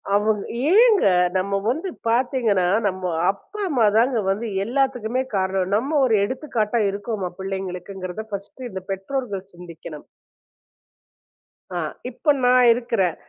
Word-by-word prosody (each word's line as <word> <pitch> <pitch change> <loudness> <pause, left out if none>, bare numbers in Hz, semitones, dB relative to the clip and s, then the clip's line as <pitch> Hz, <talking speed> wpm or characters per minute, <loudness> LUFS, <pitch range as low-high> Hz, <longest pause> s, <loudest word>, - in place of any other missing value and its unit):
அவங்க 210 0 +1 0.3
ஏங்க 440 - +6 0.3
நம்ம 200 +2 0
வந்து 320 +10 -1 0.2
பார்த்தீங்கன்னா, 235 -5 +2 0.2
நம்ம 185 -2 -2 0.2
அப்பா 420 - -13
அம்மாதாங்க 230 -2 +3
வந்து 210 +4 -1 0.2
எல்லாத்துக்குமே 250 -1 0
காரணம். 190 0 0
நம்ம 280 +7 +1
ஒரு 225 - +3
எடுத்துக்காட்டா 235 -2 -1
இருக்கோமா 200 -2 -3
பிள்ளைங்களுக்குங்கிறதை 190 +1 -5
ஃபர்ஸ்ட்டு 205 +6 -6
இந்த 190 -1 -6
பெற்றோர்கள் 200 0 -3
சிந்திக்கணும். 170 -3 -10 1.7
ஆஹ், 155 -3 -3 0.2
இப்ப 290 +4 +1
நான் 250 0 +5
இருக்கிறேன். 230 -8 0
215 Hz, 110 wpm, -22 LUFS, 190-250 Hz, 1.7 s, ஏங்க